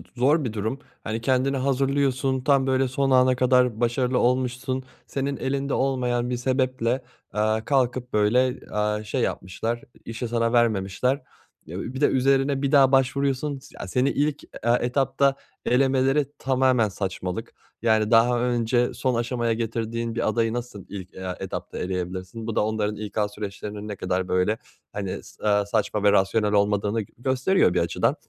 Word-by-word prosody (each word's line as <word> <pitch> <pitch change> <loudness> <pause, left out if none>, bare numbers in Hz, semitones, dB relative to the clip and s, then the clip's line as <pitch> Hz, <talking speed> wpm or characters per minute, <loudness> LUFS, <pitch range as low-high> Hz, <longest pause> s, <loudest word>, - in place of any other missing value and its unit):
zor 140 +5 +3
bir 115 -4 -3
durum. 110 +5 -3 0.2
Hani 110 +1 -3
kendini 130 +2 +1
hazırlıyorsun, 135 0 +1
tam 135 -1 +3
böyle 130 0 +2
son 135 +1 0
ana 130 0 +5
kadar 125 -3 +3
başarılı 125 +1 +1
olmuşsun, 130 +1 0 0.2
senin 140 0 -2
elinde 140 +1 -2
olmayan 125 -2 0
bir 125 - -1
sebeple, 130 -1 0 0.3
eee, 110 +1 +1
kalkıp 125 -2 0
böyle, 110 +5 +4
eee, 105 -3 -2
şey 120 +4 -2
yapmışlar, 115 +4 -2 0.2
i - - -9
işi 115 +1 -4
sana 115 0 0
vermemişler. 115 +3 +1 0.4
Ya, 85 +4 -6
bir 130 +4 -5
de - - +6
üzerine 135 +1 +2
bir 140 - 0
daha 135 -2 +6
başvuruyorsun, 135 +1 +1
s - - -17
ya, 100 - -5
seni 125 +7 +1
ilk, 145 +1 -1
e 120 - -5
etapta 135 +2 +2 0.3
elemeleri 135 +2 +3
tamamen 130 -4 +2
saçmalık. 95 +2 -4 0.3
Yani 110 -1 +2
daha 120 +1 +5
önce 120 0 +1
son 130 -3 0
aşamaya 120 0 0
getirdiğin 115 0 -3
bir - - 0
adayı 115 0 +1
nasıl 120 -5 -6
ilk, 95 -2 -8
eee, 95 -1 -5
etapta - - -6
eleyebilirsin? 95 +4 -4
Bu 115 - -3
da 105 - +2
onların 105 -1 -1
İK 105 -1 -7
süreçlerinin 105 0 -6
ne 105 - -4
kadar 90 0 -2
böyle, 95 +4 +1 0.4
hani, 100 -2 -4
s - - -16
eee, 105 -1 +3
saçma 100 0 -1
ve 100 - +6
rasyonel 105 +2 +2
olmadığını 105 +1 +2
g 100 - -12
gösteriyor 130 - +2
bir 90 - +2
açıdan. 85 - +1
120 Hz, 160 wpm, -25 LUFS, 105-130 Hz, 0.4 s, de